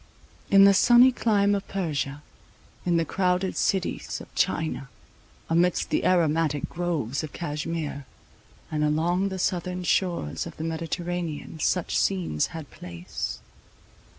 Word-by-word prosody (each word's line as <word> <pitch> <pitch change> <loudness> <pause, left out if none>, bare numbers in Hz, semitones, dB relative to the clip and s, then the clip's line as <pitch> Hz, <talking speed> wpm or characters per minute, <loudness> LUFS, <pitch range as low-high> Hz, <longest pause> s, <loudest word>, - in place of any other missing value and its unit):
In 195 0 +7
the 200 0 +8
sunny 240 +5 +7
clime 205 -4 +2
of 200 -1 -2
Persia, 150 -6 -3 0.6
in 170 -1 +3
the 165 - +1
crowded 180 +2 0
cities 190 -2 -1
of - - -13
China, 155 -4 -1 0.6
amidst 170 +2 +1
the - - +1
aromatic 160 -4 +2
groves 160 -7 -2
of 155 - -7
Cashmere, 150 -3 -4 0.6
and 150 -1 0
along 170 +6 +1
the 190 - -4
southern 180 0 -1
shores 175 - 0
of 170 - -11
the 155 - -4
Mediterranean, 165 -1 -4
such 180 +3 0
scenes 175 - 0
had 160 -3 -9
place. 85 0 -6
170 Hz, 125 wpm, -26 LUFS, 150-185 Hz, 0.6 s, the